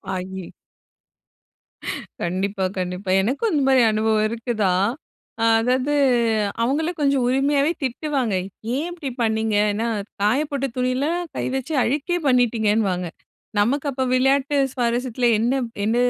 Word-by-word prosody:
அய்யி 185 -1 -6 1.7
கண்டிப்பா, 190 +2 -1
கண்டிப்பா. 180 +1 -4
எனக்கும் 280 - 0
இந்த 285 - +2
மாரி 260 -2 +5
அனுபவம் 215 0 +1
இருக்குதான். 215 -5 0 0.5
அ - - +2 0.2
அதாவது 255 +5 +1 0.7
அவங்களே 300 +7 0
கொஞ்சம் 275 -3 +2
உரிமையாவே 280 +4 +2
திட்டுவாங்க." 260 -4 -1 0.4
ஏன் 295 +6 -1
இப்டி 320 -6 -5
பண்ணினீங்க?" 220 -1 +1 0.2
எனா 225 +3 -1 0.3
காய 215 +6 +3
போட்ட 275 -1 -1
துணில 255 +2 0 0.3
கை - - -1
வச்சு 270 +4 -3
அழுக்கே 300 +7 0
பண்ணிட்டீங்கன்வாங்க. 220 -7 +2 0.5
நமக்கு 275 +7 +1
அப்ப 260 0 -2
விளையாட்டு 270 +2 +2 0.2
சுவாரஸ்யத்துல 245 0 0
என்ன 235 +3 +1 0.3
என்ன 220 +2 +1
245 Hz, 115 wpm, -22 LUFS, 215-275 Hz, 1.7 s, மாரி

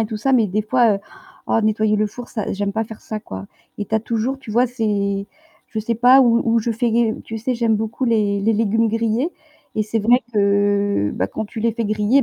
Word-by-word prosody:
et 220 - +1
tout 220 - -5
ça 270 +6 0
mais 230 -4 +4
des 210 +3 -1
fois, 225 -2 +3 0.5
ah 225 - +2
nettoyer 215 0 +2
le 215 0 +1
four 245 +3 -9
ça 215 -4 -4
j'aime 200 0 -2
pas 225 +2 -1
faire 220 0 -11
ça 215 -1 -5
quoi. 95 - -8 0.3
Et 205 - -3
tu 220 - -4
as 220 - +3
toujours, 235 +4 -2
tu 265 - -10
vois, 240 +4 +3
c'est 200 -4 -1 0.4
je 220 - -5
sais 230 +2 -1
pas 250 +3 +7
où 235 -2 +4
où 230 0 +3
je 235 - -2
fais, 230 -1 +1
tu 225 - -6
sais 250 +3 -1
j'aime 230 -2 +1
beaucoup 220 +4 -3
les 210 -4 +1
les 220 +3 +2
légumes 225 +1 +2
grillés 230 +7 0 0.5
et 215 - +2
c'est 215 +2 -2
vrai 240 +4 +3
que, 210 - 0 0.7
heu, - - -6
bah 95 - -1
quand 220 - -5
tu 220 +2 -9
les 230 0 +1
fais 230 +1 -3
griller, 215 +6 +2
220 Hz, 240 wpm, -20 LUFS, 210-235 Hz, 0.7 s, pas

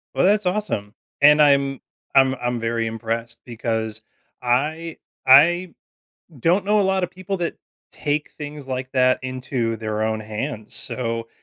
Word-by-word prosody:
Well, - - +3
that's 205 +1 +3
awesome. 180 - -2 0.3
And 150 +1 +7
I'm 140 -2 +3 0.4
I'm 135 -1 +5
I'm 120 -1 -2
very 115 0 -1
impressed 115 +1 -4
because 110 -2 -3 0.4
I 150 +7 -1 0.3
I 170 +7 +6 0.7
don't 180 - +2
know 210 +1 +3
a - - +4
lot 190 -1 +1
of 180 - -2
people 185 +1 -4
that 170 -2 -2 0.4
take 150 0 -2
things 145 -2 -8
like 130 0 -4
that 130 -1 +3
into 130 -3 -2
their 110 -1 -2
own 110 0 -1
hands. 110 +1 -5
So, 115 -2 -3
130 Hz, 145 wpm, -22 LUFS, 115-160 Hz, 0.7 s, And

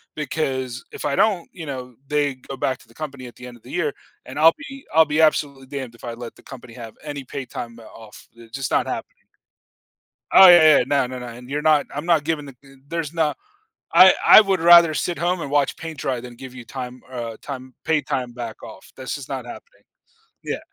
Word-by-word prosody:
because 130 -4 -3
if - - -7
I 140 -1 0
don't, 200 -6 +1
you 165 -3 -9
know, 125 -3 -7
they 145 -2 0
go 130 +1 -9
back 130 - -1
to - - -21
the 115 - -21
company 140 -2 -7
at 120 - -11
the 125 - -11
end 120 - -12
of 115 - -27
the 125 - -13
year, 155 -5 -1 0.3
and - - -8
I'll 165 +1 +7 0.2
be 275 0 -11
I'll 160 +1 +7
be 150 +1 -1
absolutely 140 -3 +1
damned 130 -3 -6
if - - -20
I 120 - -5
let 120 0 -9
the - - -20
company 125 -3 -12
have 115 -3 -9
any 145 -2 -6
paid 135 0 -7
time, 115 -1 -7
uh, - - -13
off, 110 -1 -14
eh, 115 - -14
just 135 0 -3
not - - +2
happening - - -5 1.2
Oh, 190 - +11
yeah, 160 -4 +8
yeah. - - +2
No, 140 -1 +2
no, 130 0 -7
no, 125 - -7
and 120 +1 -11
you're 150 +1 -1
not 155 -2 +3
I'm 150 +4 -5
not 165 -4 +3
giving 155 -1 -2
the 135 - -12
uh, 135 0 -17
there's 165 -1 -4
no 160 -2 0 0.6
I - - +9
I - - +10
would 195 -4 0
rather 170 -2 +7
sit 175 +3 -2
home 175 +1 0
and 140 - -6
watch 145 -2 +1
paint 165 -1 -7
dry 130 -3 -2
than 125 0 -10
give 130 0 -10
you 125 - -9
time 125 -1 -7
er, 115 -2 -5
time 130 -2 -8
paid 155 -2 0
time 130 -4 -2
back 120 -2 -8
off. - - -12
That's - - -5
just - - -8
not - - -5
happening. - - -12 0.6
Yeah. - - -3
140 Hz, 235 wpm, -22 LUFS, 125-155 Hz, 1.2 s, Oh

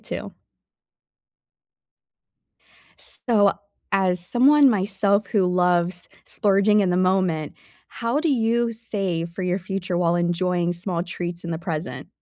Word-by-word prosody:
too. - - -7 2.6
So, 205 -5 +1 0.4
as 180 -2 +1
someone 275 +6 +5
myself 200 -1 +1
who 200 -5 +1
loves 180 0 +1 0.2
splurging 205 0 +2
in 195 -3 +2
the 180 - +1
moment, 185 -5 0 0.4
how 235 +4 -2
do 330 - +1
you 235 -2 +1
save 195 -7 -3
for 185 +3 -6
your 180 +1 -1
future 190 -1 -3
while 175 -1 +2
enjoying 175 0 0
small 175 0 -3
treats 175 -1 -6
in 170 - -5
the 165 - -2
present? 165 -1 -5
185 Hz, 125 wpm, -23 LUFS, 175-210 Hz, 2.6 s, someone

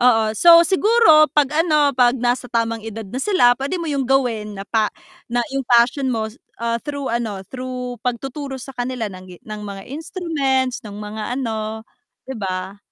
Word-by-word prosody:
Oo. 225 -3 +3
So 335 +7 +8
siguro 380 -2 +5
'pag, 295 -2 +3 0.2
ano, 300 -4 +3
'pag 245 -1 +5
nasa 245 +1 -1
tamang 230 -1 -1
edad 225 -2 -7
na 245 - -7
sila 260 -6 +4
pwede 280 +7 -3
mo 335 - -3
'yong 280 -2 0
gawin 240 -5 0
na 195 - -6
pa 220 -2 +1 0.3
na 240 0 -1
'yong 270 -2 -3
passion 245 +2 +3
mo, 220 -2 -1 0.3
ah, 230 0 0
through 285 -2 -4
ano, 225 -4 -2
through 255 -1 -5
pagtuturo 265 +2 -4
sa 270 0 -10
kanila 245 -2 -2
ng 185 -1 -11
gi 180 -1 -12
ng 215 -1 -8
mga 200 -1 -7
instruments, 275 -5 -1
ng 205 -1 -8
mga 210 +1 -6 0.2
ano, 220 -2 -3 0.5
'di 265 - -5
ba? 190 -1 -4
245 Hz, 175 wpm, -20 LUFS, 220-275 Hz, 0.5 s, So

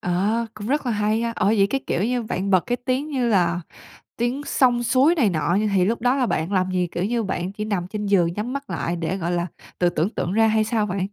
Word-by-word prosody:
ờ, 205 +6 0
cũng 210 -1 -7
rất 280 +3 0
là 240 - +1
hay 215 +2 +1
ha! 235 0 -1
Ủa, 190 - +1
vậy, 205 -2 +4
cái 275 - 0
kiểu 185 - 0
như, 245 +1 0
bạn 195 -3 -3
bật 185 -2 +5
cái 245 - 0
tiếng 260 +4 -1
như 255 -4 0
là 175 -4 +2 0.6
tiếng 240 +4 -1
sông 245 -2 +2
suối 270 +8 +4
này 240 -10 +3
nọ 170 +1 0
như 215 - 0
thì 180 -2 +4
lúc 225 +4 -1
đó 250 +2 +3
là 260 - +1
bạn 175 -5 -1
làm 185 0 +1
gì? 180 -1 0
Kiểu 175 +2 -3
như, 230 +1 0
bạn 185 -1 -3
chỉ 210 +1 -5
nằm 185 -4 -2
trên 210 +1 -4
giường 180 -4 +2
nhắm 220 +7 -4
mắt 280 -4 -5
lại 170 0 -2
để, 170 +3 -2
gọi 175 -1 -2
là, 175 0 -1 0.3
tự 175 - +3
tưởng 170 +2 0
tượng 180 -6 -3
ra 225 +1 +4
hay 220 0 +2
sao 215 -1 0
bạn? 195 -1 -3
210 Hz, 270 wpm, -23 LUFS, 180-240 Hz, 0.6 s, bật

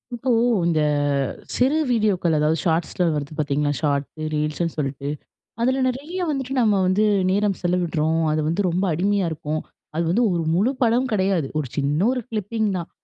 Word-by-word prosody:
இப்போ, 255 +2 -1 0.4
இந்த 165 -2 +2 0.5
அ - - -10
சிறு 265 +5 +2
வீடியோக்கள் 200 -8 +2
அதாவது 150 +2 +2
ஷார்ட்ஸில 170 +2 +1
வருது 145 +1 -4
பார்த்திங்களா? 145 0 0
ஷார்ட் 140 -2 0 0.3
ரீல்ஸ்ன்னு 150 +2 -1
சொல்லிட்டு. 140 -1 -3 0.5
அதில 260 +3 +2
நிறைய 285 +8 -5
வந்துட்டு 270 -3 -2
நம்ம 215 -3 +3
வந்து 195 +4 +3 0.3
நேரம் 200 0 +1
செலவிடுறோம். 165 -3 0
அது 155 0 +1
வந்து 170 +6 0
ரொம்ப 180 +3 0
அடிமையா 195 +3 +1
இருக்கோம். 155 0 -3 0.3
அது 170 - +1
வந்து 225 +8 +2
ஒரு 170 -1 0
முழு 205 +9 +2
படம் 240 +3 +2
கிடையாது, 190 -7 +1
ஒரு 145 - -3
சின்ன 145 +2 +1
ஒரு 255 - -2
கிளிப்பிங் 220 0 -1
தான். 170 - -6
175 Hz, 160 wpm, -22 LUFS, 155-215 Hz, 0.5 s, நம்ம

